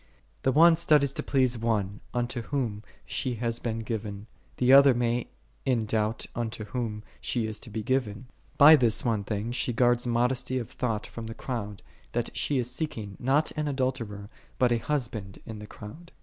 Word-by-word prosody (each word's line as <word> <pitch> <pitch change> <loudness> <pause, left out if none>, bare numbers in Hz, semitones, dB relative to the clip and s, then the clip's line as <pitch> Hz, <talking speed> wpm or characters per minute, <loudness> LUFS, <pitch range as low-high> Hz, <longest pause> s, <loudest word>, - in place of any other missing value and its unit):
The 130 - +2
one 165 +4 +7
studies 150 -4 +3
to - - -3
please 130 -4 +1
one, 105 -3 -1
unto 120 0 -2
whom 115 -5 -2 0.2
she 125 -2 -2
hath 115 0 -2
been 115 -1 -2
given; 105 -2 -5 0.3
the 125 +1 +4
other 140 -2 +8
many, 120 0 0 0.4
in 120 -4 +1
doubt 110 +1 -1
unto 115 -2 -3
whom 105 -1 -4 0.2
she 120 -3 -1
is 110 -1 -4
to 120 - -12
be 110 0 -4
given: 125 -2 -1 0.3
by 155 +3 +10
this 120 -6 +2
one 110 -4 +1
thing 105 +3 -3
she 125 0 -1
guards 120 +1 +2
modesty 125 +2 +1
of 120 -2 -4
thought 115 -4 -2
from 115 -1 -7
the 115 - -7
crowd, 105 -6 -5 0.3
that - - -2
she 145 - +1
is 125 -1 -1
seeking, 125 - -4
not 135 +5 +2
an 150 -1 -2
adulterer, 130 -7 -2 0.3
but 125 -1 +3
a 120 - +2
husband, 115 -8 -3
in 110 -1 -7
the 105 - -9
crowd. 155 - -11
120 Hz, 180 wpm, -28 LUFS, 110-130 Hz, 0.4 s, by